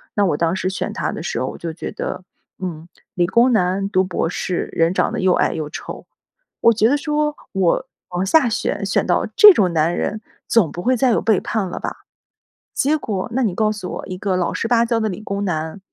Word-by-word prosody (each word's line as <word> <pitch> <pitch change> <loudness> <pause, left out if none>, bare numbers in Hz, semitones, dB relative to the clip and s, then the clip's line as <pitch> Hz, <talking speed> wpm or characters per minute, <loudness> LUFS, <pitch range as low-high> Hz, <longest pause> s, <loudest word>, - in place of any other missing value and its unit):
那 205 - +3
我 155 -6 +1
当 165 +1 +1
时 185 - -1
选 190 - -3
他 - - -2
的 - - -6
时 - - -3
候， - - -1
我 - - -6
就 165 -1 -5
觉 165 - -6
得， 185 - -5 0.4
嗯， 170 -3 -6 0.3
理 175 -1 +1
工 240 +5 +4
男、 195 -1 +1
读 185 -2 +3
博 170 -2 -1
士、 180 0 -3
人 165 +2 +2
长 - - +1
得 - - -3
又 185 -1 +3
矮 - - +2
又 155 -2 -4
丑， 160 +2 -8 0.6
我 230 - +6
觉 220 +1 +3
得 285 - +3
说， 300 0 -1 0.2
我 190 -3 +1 0.2
往 180 +1 -2
下 270 +7 +4
选 205 -3 -2
选 195 - +1
到 - - +1
这 420 -1 +10
种 185 - +2
男 160 +2 +2
人， 215 +1 -2 0.3
总 205 -10 +3
不 175 - -6
会 255 +4 +2
再 255 +2 +3
有 - - +2
背 220 -4 +2
叛 215 -5 -2
了 - - -6
吧。 - - -6 0.7
结 295 +3 +2
果， 200 -8 -3
那 265 - +1
你 200 -6 0
告 215 +1 +1
诉 210 -4 -5
我 - - -6
一 185 - -5
个 195 -2 -1
老 180 - -1
实 - - -2
巴 235 -1 +4
交 230 -1 +1
的 220 - 0
理 185 - -6
工 200 -1 -3
男 160 0 -3
195 Hz, 250 characters per minute, -20 LUFS, 175-230 Hz, 0.7 s, 这